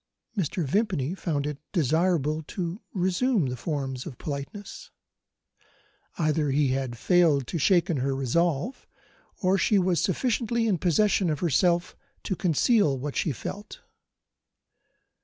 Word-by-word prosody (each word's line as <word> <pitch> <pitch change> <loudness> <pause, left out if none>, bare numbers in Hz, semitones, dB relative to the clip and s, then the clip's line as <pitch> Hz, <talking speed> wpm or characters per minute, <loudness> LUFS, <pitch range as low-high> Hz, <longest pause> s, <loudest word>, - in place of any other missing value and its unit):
Mr. 180 -3 -1
Vimpany 180 - 0
found 155 -7 -2
it 150 -1 -4
desirable 160 -2 +1
to 175 +4 -5
resume 190 - +1
the 125 -1 -2
forms 135 -1 -4
of 130 -7 -8
politeness. 150 +8 -7 1.3
Either 155 -2 +1
he 140 0 +2
had 130 -2 -2
failed 155 -1 +3
to 165 - -3
shake 175 +2 +3
her 135 -4 0
resolution, 155 - 0 0.7
or 190 +1 +3
she 210 - +3
was 185 -2 +2
sufficiently 235 +2 0
in 200 -6 +1
possession 190 +2 +2
of 150 -2 -2
herself 175 +2 +2 0.3
to 190 - -2
conceal 175 - +2
what 140 +2 -5
she 160 - 0
felt. 205 - -7
170 Hz, 125 wpm, -26 LUFS, 140-190 Hz, 1.3 s, failed